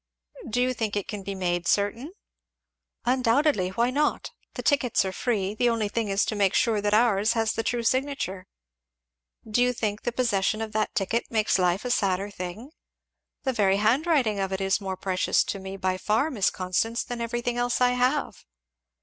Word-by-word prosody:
"Do 245 +3 +1
you 255 0 +1
think 220 -4 -3
it 205 - -2
can 210 -2 -5
be 195 0 -5
made 175 -2 -1
certain?" 230 - 0 0.9
"Undoubtedly! 255 -4 +2
why 235 +6 0
not? 295 +3 0 0.2
the - - -5
tickets 260 -8 +2
are 190 - -2
free 200 -2 -1
the 240 +3 +2
only 225 -3 0
thing 225 +1 -1
is 195 +1 +1
to 215 - -2
make 200 -2 +2
sure 220 -4 +2
that 205 0 +2
ours 215 -1 +3
has 225 -1 0
the - - -1
true 235 +1 -1
signature. 255 -8 -1 1.0
Do 220 +3 +1
you 250 0 +3
think 215 -3 -2
the 240 - -2
possession 215 -4 0
of 220 -1 -4
that 215 0 -1
ticket 225 +4 -1
makes 215 -3 +1
life 180 +4 +1
a 250 - -1
sadder 195 -2 0
thing? 195 - -7 0.7
The 265 - 0
very 195 -4 +2
handwriting 240 - +2
of 195 -1 -1
it 190 - -2
is 195 +2 +1
more 190 -1 -4
precious 185 -1 +1
to 200 - -4
me, 190 0 -7
by 185 -1 -1
far, 225 +11 +1
Miss 205 -8 +2
Constance, 185 +6 -1
than 245 -2 -6
everything 240 +1 -2
else 245 0 0
I 250 0 +4
have." 255 +4 0
220 Hz, 190 wpm, -26 LUFS, 195-245 Hz, 1.0 s, I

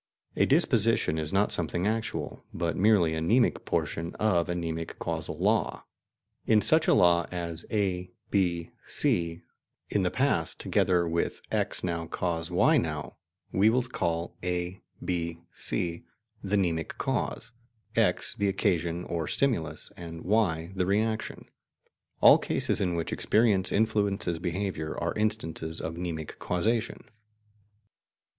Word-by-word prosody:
A - - +3
"disposition" 80 +1 +3
is 80 0 -1
not 100 +2 +2
something 85 +2 0
actual, 110 +1 -2
but 85 -1 -2
merely 95 -5 +4
the 80 - -1
mnemic 115 +9 +2
portion 85 +1 -2
of 90 -5 +1
a 90 - -1
mnemic 80 -1 -4
causal - - -4
law. - - 0 0.6
In 110 -1 +5
such 160 +6 +4
a - - +5
law 85 -1 +4
as 85 -2 -5
"A, 90 -4 -1 0.2
B, 85 -4 0 0.2
C,... 85 0 +1 0.5
in - - +2
the - - +2
past, - - 0
together 90 -2 +1
with 85 +1 -1
X - - 0
now, 85 -2 -2
cause 85 -1 -2
Y 90 - +4
now," - - -3 0.3
we 100 +3 +4
will 125 +2 +2
call 85 -9 -2
A, 90 +1 -2 0.2
B, 85 -2 -2 0.2
C,... 85 -1 -3 0.4
the 100 +1 0
mnemic 85 -4 -1
cause, - - -2 0.4
X - - +1
the 100 - 0
occasion 85 -3 0
or 85 -3 -3
stimulus, 80 - 0
and 85 -1 -8
Y 90 -5 +1
the 90 -2 -1
reaction. 110 +3 -1 0.8
All - - +8
cases - - 0
in 90 -3 0
which 85 -1 -2
experience 105 -4 +2
influences 100 -5 +1
behaviour 90 -3 -3
are 85 0 -1
instances 80 -7 -1
of 80 - -4
mnemic 85 -3 -5
causation. 110 +6 -1
90 Hz, 135 wpm, -28 LUFS, 85-100 Hz, 0.8 s, All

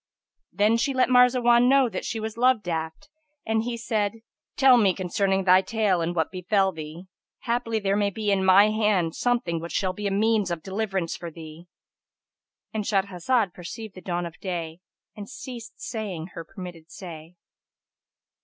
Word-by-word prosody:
'" - - -56
Then 215 +2 +3
she 270 +3 0
let 255 - +3
Marzawan 250 -1 +5
know 270 -1 +5
that 195 -5 -5
she 225 - -3
was 220 0 -5
love 250 -2 +3
daft 160 - -4 0.4
and 220 0 +1
he 235 +1 -3
said 220 -1 -2 0.3
"Tell 265 -2 +7
me 200 -5 +3
concerning 195 +1 0
thy 185 0 +6
tale 205 -4 0
and 170 +1 -2
what 160 -2 0
befel 190 +1 +1
thee: 160 +1 -8 0.4
haply 235 -1 -1
there 200 -2 0
may 205 -1 +1
be 210 +1 -2
in 195 -1 +2
my 190 +3 +6
hand 210 -6 +1
something 235 -9 0
which 170 +1 -7
shall 185 -2 0
be 205 +2 -4
a - - -1
means 210 -1 +2
of 170 -2 -4
deliverance 195 -3 -2
for 170 - -7
thee."—And 165 +6 -12
Shahrazad 200 +1 0
perceived 195 +4 -8
the 185 - -11
dawn 175 -1 -2
of 170 -1 -9
da, 170 -4 -4 0.4
and 205 -1 -8
ceased 240 -2 -9
saying 195 -8 -5
her 165 - -6
permitted 175 -3 -10
say. 170 -3 -10
200 Hz, 170 wpm, -25 LUFS, 175-225 Hz, 0.4 s, Tell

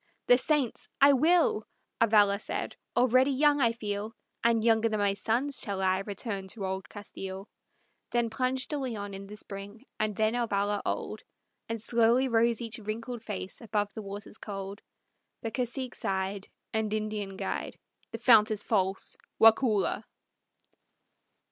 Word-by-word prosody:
"The 245 - +7
saints! 285 -4 0
I 280 +1 +7
will," 315 -5 +3 0.4
Avalla 205 -3 +5
said. - - -4 0.2
"Already 255 +2 +5
young 290 +1 +3
I 235 -2 +4
feel, 215 -1 -4 0.3
And 230 -1 +3
younger 225 0 +4
than 215 -1 -1
my 200 -1 +3
sons 240 +8 -1
shall 200 -2 -3
I 190 0 +2
return 200 0 -4
to 195 0 -4
old 190 0 -4
Castile." 195 -1 -7 0.6
Then 235 -2 0
plunged 255 +3 -1
De 295 - -1
Leon 215 -7 -4
in 195 0 -7
the 210 - -9
spring 205 +3 -9
And 215 -1 0
then 220 +2 +2
Avalla 205 -4 0
old, - - -3 0.5
Then 230 - -2
slowly 235 +3 +3
rose 230 -1 +2
each 230 -1 -4
wrinkled 225 +3 -5
face 205 -2 -6
above 210 -3 -1
the 220 - -6
waters 205 +1 -8
cold. 195 0 -6 0.6
The 225 - -2
cacique 250 +1 -2
sighed, 190 +1 -2 0.3
And 220 -1 0
Indian 210 -2 -3
guide, - - -4 0.3
"The - - -5
fount 225 -2 +6
is 210 -1 -2
false, 195 -3 0 0.2
Waukulla!" 225 -2 +4
220 Hz, 150 wpm, -29 LUFS, 200-235 Hz, 0.6 s, The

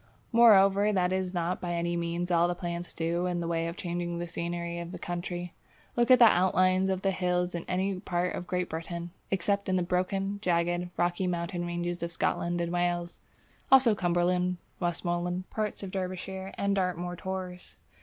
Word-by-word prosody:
Moreover 205 -3 +6
that 185 -2 +1
is 185 -1 -1
not 175 0 -2
by 175 -1 -2
any 170 0 -1
means 170 +1 -2
all 170 0 +4
that 175 0 -2
plants 175 0 -4
do 170 +2 -1
in 175 -1 -1
the 170 - -2
way 165 0 0
of 170 - -5
changing 175 -1 -3
the 175 - -3
scenery 170 0 -4
of 170 0 -6
the - - -6
country. 175 0 -4 0.4
Look 240 0 +2
at 255 - +9
the 240 - +8
outlines 185 -1 +4
of 190 0 -1
the 195 - +3
hills 180 -1 0
in 170 - -4
any 190 +1 -1
part 180 -2 -1
of 180 - -5
Great 180 0 -1
Britain 170 +1 -5 0.2
except 200 +1 0
in 185 - +2
the 180 - +2
broken, 195 +3 -1
jagged, 175 -1 +1
rocky 175 +1 +1
mountain 175 0 -2
ranges 175 0 -3
of 170 0 -3
Scotland 175 +1 0
and 170 0 -2
Wales 175 0 -1 0.5
(also 260 -4 +7
Cumberland, 180 -1 +1 0.2
Westmorland, 175 +1 -1
parts 215 -2 -3
of 190 - -5
Derbyshire 190 0 -4
and 200 0 +1
Dartmoor 180 -2 -1
tors). 185 -1 -6
180 Hz, 185 wpm, -29 LUFS, 175-190 Hz, 0.5 s, at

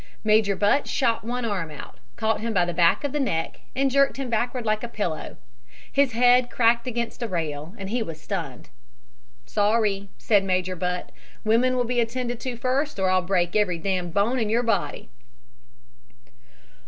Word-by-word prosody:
Major 215 -2 +3
Butt 210 +9 +2
shot 235 -4 +1
one 240 +1 -3
arm 195 -7 -2
out, 150 - -10 0.2
caught 220 -1 0
him 225 -1 -2
by 180 -1 +4
the 175 - -3
back 170 - +3
of 285 - -1
the 295 - -1
neck 165 - -1 0.2
and 270 0 +2
jerked 275 0 +3
him 265 -3 -4
backward 240 +2 -1
like 215 0 +1
a - - -2
pillow. 205 -9 -4 0.5
His 275 -3 +2
head 245 +1 +4
cracked 235 0 +2
against 235 0 -3
a 235 - -1
rail 160 -1 -4
and 195 - -6
he 240 +1 0
was 165 -7 -5
stunned. - - -5 0.8
"'Sorry,' 205 - +1
said 205 -3 +3
Major 185 -1 0
Butt, 180 +1 -3 0.3
'women 235 +4 +3
will 250 - +2
be 245 0 -1
attended 240 0 -2
to 245 -1 -4
first 260 +4 -1
or 190 -1 +2
I'll 185 0 +3
break 180 -1 0
every 200 -5 +2
damned 180 0 -2
bone 215 +8 +1
in 220 -3 0
your 235 +3 +2
body.' 205 - -1
220 Hz, 180 wpm, -25 LUFS, 185-245 Hz, 0.8 s, by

